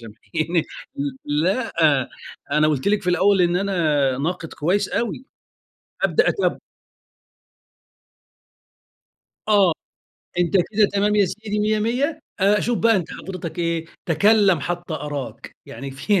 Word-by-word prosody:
سامحيني 155 +9 -2 0.6
ل 150 +1 0
لأ، 225 +6 0 0.8
أنا 155 0 +4
قُلت 145 +2 0
لِك 210 0 +1
في 180 - 0
الأول 195 +2 +3
إن 175 0 +2
أنا 155 -9 +1
ناقد 165 +2 -3
كويس 190 +6 0
أوي. 240 +3 -3 0.8
أبدأ 460 - +3
أتابعه. 395 - 0 2.9
آه. 200 -6 +4 0.7
أنت 175 -2 +1
كده 205 +3 +2
تمام 205 +1 +2
يا 205 - +5
سيدي 210 +3 -4
مِيّة 215 +1 +1
مِيّة 265 +8 -1 0.2
أ 200 +2 +4
أشوف 240 +2 0
بقى 225 -1 +4
أنت 180 - -3
حضرتك 180 -4 -7
إيه؟ 170 -1 -1 0.2
تَكلَّم 195 +1 +4
حتّى 175 0 -4
أراك. 145 -3 -6
يعني 135 0 -7
في 180 +9 0
185 Hz, 125 wpm, -22 LUFS, 160-210 Hz, 2.9 s, يا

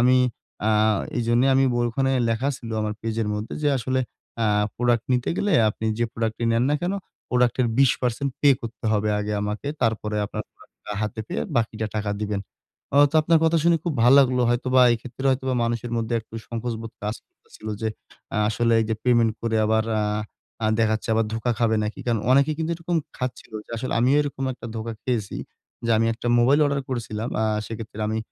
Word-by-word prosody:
আমি 125 +2 +5 0.5
আ - - +4 0.5
এইজন্য 120 0 +2
আমি 135 0 +4 0.2
ওইখানে 120 +3 +1
ব - - +1
লেখা 115 +4 0
ছিল, 115 - -9
"আমার 105 0 -2
পেজের 115 -1 -2
মধ্যে 105 +1 -4
যে 150 - +3
আসলে 130 +2 0 0.4
আ - - +3 0.3
প্রোডাক্ট 120 -1 +1
নিতে 125 -1 +1
গেলে 205 -1 0 0.2
আপনি 110 - -5
যে 120 - +2
প্রোডাক্টটি 115 0 -2
নেন 115 +1 +2
না - - +3
কেন, 180 +2 0 0.4
প্রোডাক্টের 125 0 +2
২০% 135 0 +2
পে 145 - +5
করতে 115 0 -8
হবে 105 0 +1
আগে 105 0 -2
আমাকে। 105 +6 -3
তারপরে 110 -2 0
আপনার - - -5
প্রোডাক্টটা - - -12
হাতে 110 0 -3
পেয়ে 180 - -2
বাকিটা 110 -1 0
টাকা 105 -1 -1
দিবেন।" 105 -1 -2 0.6
অ - - +7
তো - - -17
আপনার 165 +1 +4
কথা 165 +1 +3 0.3
খুব 170 - 0
ভালো 125 +3 +7
লাগলো 125 -2 +2
হয়তোবা 130 +1 +3
এক্ষেত্রে 125 +3 -8
হয়তোবা 130 0 0
মানুষের 120 0 -2
মধ্যে 115 +1 -1
একটু 110 - -18
সংকোচ 115 0 -3
বোধ 115 - -8
কাজ 105 +1 -1
করতেছিল 110 - -16 0.2
যে 110 - +1 0.5
আ - - 0
আসলে 115 +1 +1
এইযে, 110 0 0
"পেমেন্ট 120 -3 +4
করে 115 -1 0
আবার 110 0 +2 0.8
আ - - +3
দেখা 110 -1 +3
যাচ্ছে 110 - -5
আবার 115 0 +2
ধোকা 115 +2 -1
খাবে 115 -2 +2
নাকি।" 105 - -4
কারণ 115 -3 +1
অনেকে 140 +3 +5
কিন্তু 160 0 -1
এরকম 170 +1 -2 0.2
খাচ্ছিল 125 -3 -5
যে - - -18
আসলে 130 +3 -3
আমিও 130 +4 +4
এরকম 140 -2 -4
একটা 125 - -9
ধোকা 115 +1 -4
খেয়েছি 115 -6 -2 0.5
যে - - +1
আমি 115 - +2
একটা 120 - -7
মোবাইল 135 +5 +4
অর্ডার 140 -1 0
করেছিলাম, 115 -3 -3
আ - - +2 0.2
সেইক্ষেত্রে 110 -1 -7
আমি 110 +1 -1
115 Hz, 190 wpm, -24 LUFS, 110-130 Hz, 0.8 s, অ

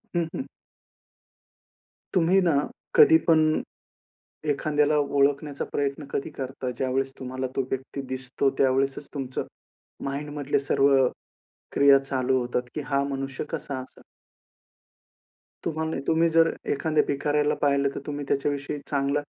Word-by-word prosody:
हं, 170 - +2
हं. 265 - -3 1.7
तुम्ही 180 +2 +4
ना, 175 -3 +3 0.4
कधीपण 325 - +6 1.1
एखाद्याला 150 +1 +2
ओळखण्याचा 140 0 +1
प्रयत्न 140 +1 -1
कधी 140 - -3
करता, 130 -1 -4
ज्यावेळेस 135 +1 0
तुम्हाला 130 0 -3
तो 135 - +2
व्यक्ती 135 +1 -4
दिसतो. 130 +1 -1
त्यावेळेसचं 135 +1 +1
तुमचं 135 -3 -3 0.6
माइंडमधले 145 0 -2
सर्व 140 +1 +4 0.8
क्रिया 140 -1 +7
चालू 130 -1 0
होतात 125 0 -1
की 150 - -2
हा 140 -1 +1
मनुष्य 135 0 -3
कसा 145 -4 -3
असेन. 130 - -14 1.6
तुम्हाला 160 0 -2
तुम्ही 165 +1 +4
जर 165 0 +4 0.2
एखाद्या 155 +1 +1
भिकाऱ्याला 145 +1 +1
पाहिलं 140 -1 +3
तर - - -3
तुम्ही 145 -1 -4
त्याच्याविषयी 145 +1 -1
चांगला, 140 0 +1
140 Hz, 115 wpm, -26 LUFS, 135-150 Hz, 1.7 s, क्रिया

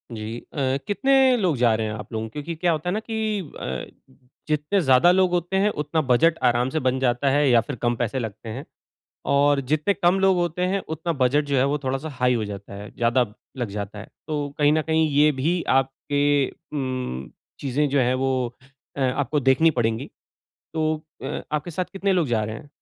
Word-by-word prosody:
जी 110 +2 -5 0.2
अ, 135 -2 0
कितने 265 +3 +4
लोग 180 -8 +1
जा 120 -2 +4
रहे 110 0 -1
हैं 105 - -4
आप 110 - -8
लोग? 110 0 -3
क्योंकि 155 +3 -5
क्या 175 +1 +1
होता 160 +3 -2
है - - 0
ना 215 - 0
कि 220 -2 -2 0.2
अ, 65 - -4 0.6
जितने 155 +6 +1
ज़्यादा 135 +5 +5
लोग 185 -1 +3
होते 175 +2 -1
हैं, 205 - +3
उतना 150 -3 -1
बजट 155 +5 +3
आराम 120 +2 +1
से 155 - -1
बन 130 -1 0
जाता 125 +1 +1
है 145 0 +3
या 120 -2 +5
फिर 145 - -6
कम 120 0 +1
पैसे 120 +2 -2
लगते 110 -1 -6
हैं। 130 +6 -6 0.7
और 140 0 +4
जितने 155 +6 +2
कम 185 0 +2
लोग 190 -1 +4
होते 175 0 -1
हैं, 195 +1 0
उतना 160 +2 -2
बजट 145 +4 +3
जो 140 -1 0
है 130 - +4
वो 145 +1 0
थोड़ा 130 +1 0
सा 155 +3 -6
हाई 125 0 +3
हो 115 -3 0
जाता 100 -1 -8
है, 105 +1 -8
ज़्यादा 120 +1 +2 0.3
लग 120 -4 -2
जाता 100 +1 -6
है। - - -8 0.2
तो 145 -2 -2
कहीं 145 0 +4
न 155 - +2
कहीं 160 0 +2
ये 150 +2 +4
भी 160 +6 0 0.2
आपके 135 +2 -1 0.2
उम्म, 130 - -5 0.3
चीज़ें 145 +2 0
जो 140 0 +2
हैं 125 0 +2
वो 130 -2 -1 0.4
अ, - - -2
आपको 135 +3 0
देखनी 135 +5 +4
पड़ेगी। 115 -4 -1 0.7
तो 155 0 +1 0.3
अ, - - -4
आपके 150 +3 -2
साथ 180 +3 -2
कितने 195 0 0
लोग 175 -4 +2
जा 110 -2 +1
रहे 110 +1 -5
हैं? 145 - -12
145 Hz, 210 wpm, -24 LUFS, 125-165 Hz, 0.7 s, ज़्यादा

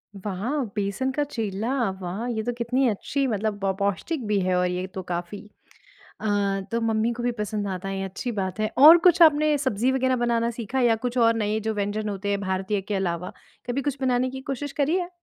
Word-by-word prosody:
वाह! 210 +9 -2
बेसन 205 +6 -1
का 295 +3 0
चीला। 225 -3 -3 0.3
वाह! 185 +6 -4
ये 225 -3 -2
तो 245 - -1
कितनी 250 +3 +1
अच्छी 275 +6 -1
मतलब 215 -2 -1
प 195 -1 +2
पौष्टिक 200 - -1
भी 210 -1 +2
है 185 0 +1
और 180 0 +2
ये 180 +1 -2
तो 190 0 -7
काफ़ी। 175 +3 -4 0.8
अ, - - -4 0.4
तो 230 - 0
मम्मी 225 0 +1
को 240 +1 -5
भी 245 0 0
पसंद 210 -1 -2
आता 190 0 -4
है 195 0 -3
ये 195 - -2
अच्छी 195 +6 -4
बात 190 -2 -3
है। 215 - 0
और 310 +5 +10
कुछ 355 0 +6
आपने 305 -1 +5
सब्ज़ी 260 -2 +1
वग़ैरह 260 -1 +1
बनाना 235 -1 +1
सीखा 235 +2 -3
या 240 -2 +4
कुछ 245 +1 -2
और 230 -1 +5
नए 215 -1 0
जो 220 +1 -2
व्यंजन 205 +1 -2
होते 200 0 -3
हैं 200 0 0
भारतीय 190 +1 -1
के 205 +2 -4
अलावा 180 -2 -2 0.3
कभी 250 +3 -1
कुछ 280 0 -2
बनाने 255 -1 +1
की 265 +1 -7
कोशिश 275 +1 -4
करी 295 +5 +1
है? 360 -2 -2
220 Hz, 215 wpm, -25 LUFS, 200-255 Hz, 0.8 s, और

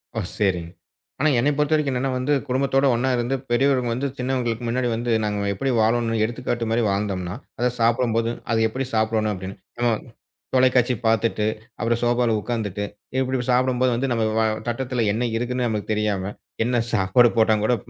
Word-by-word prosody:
ஓ - - 0 0.2
சரி. 95 -4 +1 0.6
ஆனா 155 +3 +3
என்னைய 145 +5 +2
பொறுத்தவரைக்கும் 150 -1 +2
என்னன்னா 130 +1 -1
வந்து, 130 +4 0
குடும்பத்தோட 135 +1 +1
ஒண்ணா 130 +3 0
இருந்து 120 +3 0 0.2
பெரியவர்கள் 125 -1 +2
வந்து 130 +4 -1
சின்னவர்களுக்கு 125 -2 -1
முன்னாடி 125 +1 0
வந்து 120 +1 -2
நாங்க 105 -1 -1
எப்டி 135 +7 -1
வாழணும்னு 115 0 +1
எடுத்துக்காட்டு 120 0 -3
மாதிரி 115 +1 +2
வாழ்ந்தோம்னா, 100 -2 -2 0.2
அதச் 125 0 0
சாப்பிடும்போதும் 115 0 +1
அத 115 - +2
எப்டிச் 130 +3 -5
சாப்பிடணும் 110 -1 +1
அப்டின்னு, 95 0 -7 0.2
நம்ம 120 0 +2 0.6
தொலைக்காட்சி 125 -1 +4
பாத்துட்டு 110 -1 +2 0.3
அப்புறம் 115 0 0
சோபாவுல 120 -2 +2
உக்காந்துட்டு 105 -4 -3 0.3
இப்படி 130 -1 -1
சாப்பிடும்போது, 125 0 +2
வந்து 135 +3 -1
நம்ம 115 -1 0 0.5
தட்டுல 125 -1 -1
என்ன 120 +3 0
இருக்குன்னு 125 +1 -1
நமக்குத் 110 -1 -2
தெரியாம 105 -2 -1 0.3
என்ன 120 0 +1 0.2
சாப்பாடு 105 +4 +4
போட்டாங்கூட 110 +1 +3
120 Hz, 150 wpm, -23 LUFS, 110-125 Hz, 0.6 s, தொலைக்காட்சி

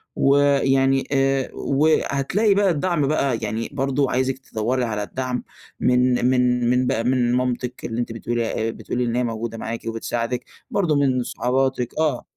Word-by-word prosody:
ويعني 135 -1 +3
آآ 135 -1 +1
وهتلاقي 155 +7 +1
بقى 200 0 +3
الدعم 160 -2 0
بقى، 140 -4 +1
يعني 110 +2 -3
برضه 135 0 0
عايزِك 130 +1 0
تِدوَّري 125 0 -2
على 105 -2 -2
الدعم 125 +2 -3 0.4
من 125 0 +2
من 125 -1 +2
من 125 0 +2
بقى 115 - 0
من 125 -1 +2
مامتِك 125 0 -2
اللي 115 0 -3
أنتِ 120 - -4
بتقولي 115 -1 -2
بتقولي 125 +2 -3
إن 115 0 -1
هي 125 - +1
موجودة 115 0 -4
معاكِ 115 +1 -4
وبتساعدِك، 115 +2 -3 0.3
برضه 170 -7 +1
من 130 -3 +2
صحباتِك 130 0 -1
آه، 150 -6 +1
125 Hz, 150 wpm, -22 LUFS, 120-135 Hz, 0.4 s, ويعني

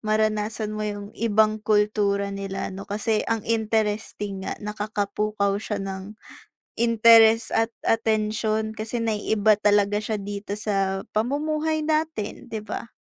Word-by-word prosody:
maranasan 215 0 0
mo 215 - -4
'yung 205 0 -6
ibang 215 -1 +2
kultura 210 -1 +1
nila 195 -1 -4
'no, 195 +1 -8
kasi 215 +1 0
ang 225 -1 -1
interesting 210 -3 -1
nga, - - -3
nakakapukaw 210 -1 -1
siya 210 - -3
ng 195 +2 -6 0.6
interes 230 -1 +6
at 225 0 +2 0.2
atensyon 220 -1 +1
kasi 220 +2 -4
na-iiba 215 -1 +2
talaga 205 0 +3
siya 215 0 -2
dito 200 0 -5
sa 195 -2 -1
pamumuhay 305 +7 0
natin, 310 -8 -2
'di 220 -2 -5
ba. 220 - -6
215 Hz, 125 wpm, -24 LUFS, 205-225 Hz, 0.6 s, interes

